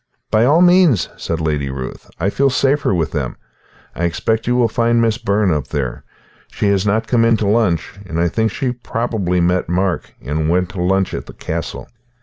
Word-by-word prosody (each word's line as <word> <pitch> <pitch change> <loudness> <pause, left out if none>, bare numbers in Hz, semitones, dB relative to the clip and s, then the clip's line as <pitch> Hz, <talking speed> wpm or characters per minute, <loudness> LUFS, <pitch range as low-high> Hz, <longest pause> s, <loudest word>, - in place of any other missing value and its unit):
"By 110 +2 +4
all 155 +7 +5
means," 175 - +4
said 85 - -3
Lady 75 -3 -1
Ruth. 65 -1 -7
"I 100 - 0
feel 140 +4 +2
safer 135 +1 +1
with 85 -5 0
them. - - -3 0.6
I 85 - -1
expect 110 +7 -1
you 125 - +2
will 125 -2 +3
find 115 +1 +1
Miss 115 -1 +1
Byrne 100 -5 +1
up 75 -4 -2
there. 65 -4 -3 0.4
She 105 - -1
has 100 0 +1
not 110 +2 +1
come 120 -2 +2
in 115 -1 +4
to 105 - -1
lunch, 100 -4 0
and 85 -1 -3
I 85 - +3
think 110 +6 0
she 130 0 -2
probably 115 -7 -2
met 90 0 +1
Mark 90 +1 -1
and 75 +3 -1
went 90 +1 +1
to 90 - -5
lunch 95 +1 +1
at - - -5
the - - -10
castle. - - -5
100 Hz, 200 wpm, -18 LUFS, 85-115 Hz, 0.6 s, all